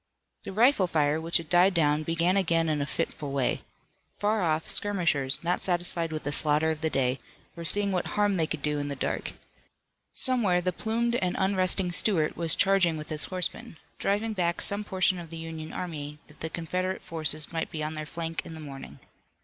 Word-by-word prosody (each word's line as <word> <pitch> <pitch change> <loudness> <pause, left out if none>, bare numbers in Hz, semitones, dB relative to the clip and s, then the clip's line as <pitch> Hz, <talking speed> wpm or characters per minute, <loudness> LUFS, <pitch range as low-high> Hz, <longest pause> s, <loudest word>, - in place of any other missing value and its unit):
The - - -5
rifle 220 -1 +4
fire, 155 -1 +1
which 165 +1 +2
had 165 -2 -6
died 180 +3 +4
down, 150 -2 +2
began 165 +3 +1
again 165 -4 +2
in 150 -2 0
a 140 - -2
fitful 145 -2 -4
way. 135 -2 0 0.6
Far 210 +1 +1
off, 160 -2 0
skirmishers, 165 -10 +2
not 175 +1 0
satisfied 175 -2 +1
with 155 -1 -4
the 145 - -2
slaughter 150 +1 +2
of 155 -1 -5
the 160 - 0
day, 130 -2 0 0.4
were 170 - -7
seeing 200 +3 +2
what 180 -2 -1
harm 205 -2 +1
they 160 -2 +1
could 155 -3 -4
do 150 -1 0
in 145 - -3
the 140 - -4
dark. - - -3 0.8
Somewhere 230 -9 +2
the 180 +1 -1
plumed 235 +4 -1
and 180 -4 -1
unresting 190 -1 +1
Stuart 170 -4 +2
was 165 -1 +4
charging 190 -5 +3
with 150 - -7
his 155 -1 +3
horsemen, 180 -3 -3 0.2
driving 210 +3 0
back 175 -3 0
some 200 +1 +2
portion 185 -2 +1
of 170 -2 -9
the 165 - -7
Union 160 -1 -7
army 150 -4 -5
that 150 - -20
the 160 - -4
Confederate 185 +3 -3
forces 155 -2 +1
might 165 -1 -2
be 155 -1 -4
on 155 +1 -3
their 155 -1 -5
flank 165 0 -4
in 165 - -9
the - - -9
morning. 140 -3 -9
165 Hz, 200 wpm, -27 LUFS, 155-185 Hz, 0.8 s, rifle